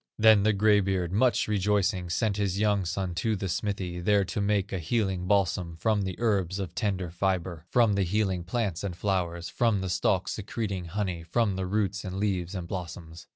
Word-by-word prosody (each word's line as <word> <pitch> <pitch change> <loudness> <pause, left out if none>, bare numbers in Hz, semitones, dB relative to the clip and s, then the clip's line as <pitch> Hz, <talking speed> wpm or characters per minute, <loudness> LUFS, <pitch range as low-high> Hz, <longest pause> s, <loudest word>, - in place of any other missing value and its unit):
Then 110 -2 +6
the 110 +2 +3
gray 105 0 +4
beard, 95 -3 -1
much 120 +5 +2
rejoicing, 100 -3 +1
Sent 100 +4 0
his 100 -2 0
young 105 -2 +2
son 90 +1 -2
to 105 +6 0
the 95 0 -3
smithy, 90 -1 -2
There 100 +2 +3
to 100 - -3
make 100 -1 0
a 95 - -1
healing 95 -1 -1
balsam, 90 -4 +1
From 110 +2 +1
the 95 -2 -3
herbs 100 -6 0
of 95 -3 -4
tender 95 -6 -2
fibre, 90 -2 -2
From 115 -4 +4
the 100 - +1
healing 95 -1 0
plants 100 -2 -2
and 95 -4 -3
flowers, 85 -3 -1
From 115 -5 +1
the 95 - -3
stalks 95 +1 +1
secreting 100 -3 -4
honey, 90 -1 -3
From 100 +4 0
the 95 -1 -2
roots, 100 0 -1
and 95 -1 -5
leaves, 95 -3 -1
and 90 -2 -4
blossoms. 85 -2 -7
95 Hz, 195 wpm, -28 LUFS, 90-105 Hz, -, Then